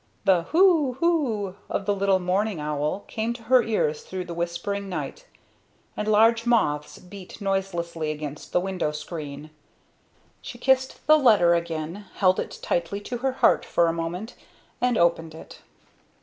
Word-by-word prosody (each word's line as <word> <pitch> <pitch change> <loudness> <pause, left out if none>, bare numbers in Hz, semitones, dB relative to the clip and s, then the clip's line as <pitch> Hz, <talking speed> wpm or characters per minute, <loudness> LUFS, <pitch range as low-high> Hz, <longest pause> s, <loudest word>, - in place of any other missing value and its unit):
The 180 -3 +3
"hoo! 325 -6 +4
hoo!" 260 - 0 0.2
of 200 - -2
the 205 - +2
little 195 -1 +2
mourning 185 +1 -1
owl 150 +5 -2
came 225 +2 -2
to 235 -1 -12
her 250 +2 +5
ears 205 -10 -1
through 185 -1 -6
the 170 - -6
whispering 175 +4 -3
night, 155 -7 -6 0.7
and 210 - -3
large 225 +2 +4
moths 150 -11 +1
beat 185 +2 -12
noiselessly 175 -5 -2
against 150 -1 -6
the - - +3
window 180 -4 -2
screen. 150 -1 -7 0.9
She 240 - -8
kissed 260 +1 +1
the 310 0 +7
letter 210 -10 +5
again, 170 +3 -3
held 185 -2 +3
it - - -5
tightly 175 +4 -1
to 245 +4 -5
her 265 +1 0
heart - - +3
for 170 - +2
a 165 - +1
moment, 175 +7 -4 0.5
and 245 -2 +2
opened 165 -2 +1
it. - - -12
190 Hz, 155 wpm, -25 LUFS, 165-225 Hz, 0.9 s, the